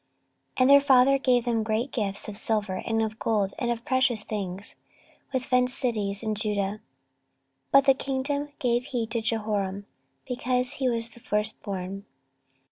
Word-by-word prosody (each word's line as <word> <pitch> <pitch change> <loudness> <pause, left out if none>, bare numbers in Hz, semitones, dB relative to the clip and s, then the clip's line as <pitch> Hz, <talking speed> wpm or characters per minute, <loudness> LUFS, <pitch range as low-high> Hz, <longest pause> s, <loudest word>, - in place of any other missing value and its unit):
14:021:003 - - +1
And 255 - +5
their 280 0 +9
father 275 -1 +5
gave 250 -3 +2
them 230 -2 +1
great 220 +4 -1
gifts 200 -4 -2
of 210 - -6
silver, 210 -3 -1
and 225 -1 +1
of 220 0 -4
gold, 205 -4 0
and 240 -3 -1
of 235 0 -3
precious 260 -5 +2
things, 200 -2 -4 0.6
with 260 -1 -1
fenced 250 0 +1
cities 210 -5 -1
in 215 -1 -1
Judah: 210 0 -1 0.9
but 275 0 +6
the 270 - +7
kingdom 275 +2 -2
gave 245 -1 0
he 250 -5 -2
to 230 +1 -2
Jehoram; 210 -3 -2 0.4
because 250 0 -1
he 260 -2 0
was 230 -1 +1
the 235 - -17
firstborn. 200 -4 -2
230 Hz, 160 wpm, -26 LUFS, 210-255 Hz, 0.9 s, their